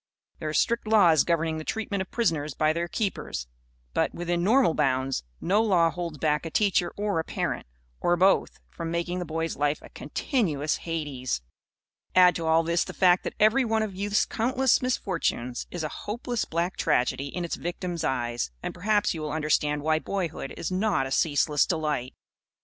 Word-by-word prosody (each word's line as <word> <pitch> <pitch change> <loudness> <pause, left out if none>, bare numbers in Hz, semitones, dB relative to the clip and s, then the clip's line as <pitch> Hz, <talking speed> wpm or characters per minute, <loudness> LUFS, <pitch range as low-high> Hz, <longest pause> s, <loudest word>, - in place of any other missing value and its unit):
There 155 - -3
are - - -4
strict 235 -1 +1
laws 180 -9 +5
governing 165 -2 0
the - - -6
treatment 205 +1 -2
of 190 - -5
prisoners 155 - 0
by 155 0 +2
their 170 +1 -2
keepers. 190 - -3 0.5
But, - - 0
within 175 0 -1
normal 230 -2 +4
bounds, 135 - 0 0.2
no 200 +5 +2
law 180 -7 +3
holds 170 -3 -5
back 150 0 +1
a 165 - -4
teacher 190 -1 +2
or 205 -4 0
a - - 0
parent - - -3 0.3
or 175 0 +2
both 190 +2 +3
from 165 -1 -5
making 170 +2 -2
a - - -3
boy's 165 +1 -2
life 145 +1 +1
a - - -12
continuous 155 - -1
Hades. 145 - -3 0.7
Add 180 -1 +7
to 165 -1 -3
all 160 +1 +4
this 170 +1 +1
the - - -8
fact 180 -1 +4
that - - -4
every 220 +6 +5
one 220 -2 +1
of 210 -3 -4
youth's 205 +2 +1
countless 255 +2 +2
misfortunes 170 - -1
is 175 -2 -5
a 155 - -2 0.2
hopeless 235 +2 -2
black 170 +3 -2
tragedy 130 +2 +1
in 175 +5 -4
its 170 - -5
victim's 175 0 -4
eyes, 120 - -1
and - - -3
perhaps 205 +3 +1
you 160 - -5
will 150 -1 -3
understand 150 -1 0
why 155 0 +2
boyhood 175 -2 -3
is 170 - -3
not 185 -7 +1
a 135 - -6
ceaseless 145 0 +2
delight. 150 -6 -2
170 Hz, 185 wpm, -27 LUFS, 150-195 Hz, 0.7 s, Add